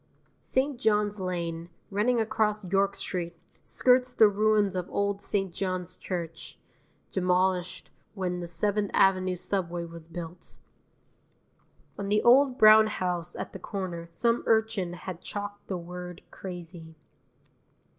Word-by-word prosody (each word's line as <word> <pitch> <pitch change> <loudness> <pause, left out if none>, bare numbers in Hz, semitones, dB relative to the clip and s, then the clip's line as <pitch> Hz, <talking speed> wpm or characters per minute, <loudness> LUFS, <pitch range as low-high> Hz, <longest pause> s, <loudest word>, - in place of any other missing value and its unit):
St. 260 0 -1
John's 210 -3 +1
Lane, 170 -2 -3 0.2
running 225 +5 +2
across 215 -2 0
York 195 +2 +1
Street, 170 -2 -4 0.3
skirts 250 0 +2
the 220 - +7
ruins 205 -1 +2
of 180 0 -3
old 200 0 -1
St. 195 -3 -1
John's 185 -1 -2
Church, 170 -3 -6 0.5
demolished 180 -1 0 0.2
when 180 -2 -2
the 175 - -5
Seventh 205 +4 0
Avenue 185 -1 +3
subway 175 -2 -2
was 165 -1 -11
built. 170 0 -9 1.4
On 200 0 -3
the 210 +1 +2
old 260 +1 +5
brown 215 -2 +8
house 180 -4 -3
at - - -5
the - - -7
corner 175 -4 -5
some 230 +7 +1
urchin 220 -5 +1
has 180 0 -6
chalked 205 +1 -6
the 190 - -2
word 180 0 -8
CRAZY. 170 -3 -8
190 Hz, 125 wpm, -28 LUFS, 175-210 Hz, 1.4 s, brown